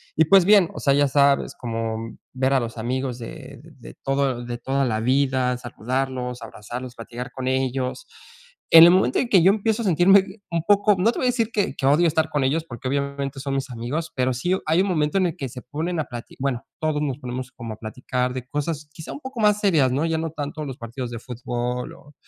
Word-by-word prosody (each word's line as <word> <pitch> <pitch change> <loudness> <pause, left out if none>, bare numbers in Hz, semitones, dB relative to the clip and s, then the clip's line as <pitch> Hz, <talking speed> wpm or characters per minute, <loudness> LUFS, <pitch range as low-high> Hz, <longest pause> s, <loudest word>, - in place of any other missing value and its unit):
y 160 - +4
pues 190 +2 +6
bien, 200 -4 +6
o - - -5
sea, 140 - +3
ya 145 0 +4
sabes, 140 0 +2
como, 115 -2 -3
mm, 115 0 -8 0.2
ver 130 +1 +1
a 135 - +4
los 115 0 -5
amigos 125 +2 -2
de 115 - -9 0.2
de - - -12
todo 135 -3 0
de 120 0 -5
toda 135 +3 0
la 110 -3 0
vida, 130 0 +2
saludarlos, 125 +1 -3
abrazarlos, 120 +3 -8
platicar 120 +2 -7
con 130 -1 -5
ellos. 130 - -1 0.6
En 165 0 +11
el 175 - +8
momento 180 -9 +3
en 245 - -1
que 185 -6 +5
yo 190 - +7
empiezo 220 +2 0
a - - -4
sentirme 190 +2 +5 0.2
un 165 -1 -1
poco 205 0 +5
no 200 +6 +3
te - - -5
voy 255 - +1
a - - +4
decir 235 -2 0
que, 205 -2 -1
que 135 - -3
odio 150 +5 +4
estar 160 0 +1
con 145 -2 +1
ellos 155 +5 +1
porque 130 -1 -7
obviamente 140 0 -2
son 140 0 -3
mis 135 0 -2
amigos, 125 +8 -4
pero 130 0 +1
sí 175 +10 0
hay 160 +4 +3
un 195 - 0
momento 155 0 +1
en 185 - +3
el 170 - -4
que 135 - -4
se 125 +1 -9
ponen 160 +7 -3
a 155 - -1
plati 120 -1 -9
bueno, 130 -3 -2
todos 155 -2 0
nos 140 -2 -2
ponemos 125 0 -6
como 115 -3 -7
a - - -25
platicar 125 +2 -3
de 130 -1 -6
cosas, 150 +2 -3
quizás 155 +1 -8
un - - -8
poco 260 -2 -7
más 210 -1 +4
serias, 160 -11 +3
¿no?, 140 +5 0
ya 165 -1 0
no 160 -1 -3
tanto 150 0 -5
de 150 - -4
los 130 -2 -7
partidos 120 +1 -6
de 115 - -5
fútbol 125 0 -4
o 145 +1 -17
135 Hz, 235 wpm, -23 LUFS, 125-165 Hz, 0.6 s, En